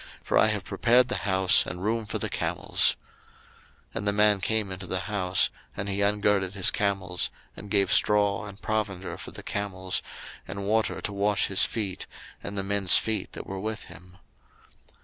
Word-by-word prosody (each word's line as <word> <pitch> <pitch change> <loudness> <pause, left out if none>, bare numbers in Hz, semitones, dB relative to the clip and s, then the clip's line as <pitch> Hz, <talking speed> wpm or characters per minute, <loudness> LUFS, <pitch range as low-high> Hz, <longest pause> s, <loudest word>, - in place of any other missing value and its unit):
for - - -2
I - - +6
have 105 -3 -1
prepared 125 +4 +3
the 125 - 0
house, 95 0 +5
and 90 +1 -6
room 110 +1 -1
for - - -2
the - - -2
camels. - - +2 1.0
01:024:032 - - -25
And 100 - -4
the - - +4
man 105 -1 +3
came 110 -1 -1
into 95 0 -7
the 95 0 -2
house: 95 -2 +1 0.3
and 100 - -3
he 100 0 -1
ungirded 100 -2 +1
his 95 - +4
camels, 95 -3 0 0.3
and 105 - -10
gave 100 -3 +2
straw 105 0 +3
and 100 0 -11
provender 105 -4 -3
for - - -8
the - - -10
camels, 95 -2 -3 0.5
and 100 +1 -5
water 110 +2 0
to 100 - -4
wash 100 0 +1
his 100 - +3
feet, 100 -5 -4 0.3
and 100 0 -6
the 100 - -1
men's 100 -2 +4
feet 110 -1 -2
that - - -7
were 95 0 -6
with 110 +2 -4
him. 90 +2 -16
100 Hz, 185 wpm, -27 LUFS, 95-105 Hz, 1.0 s, I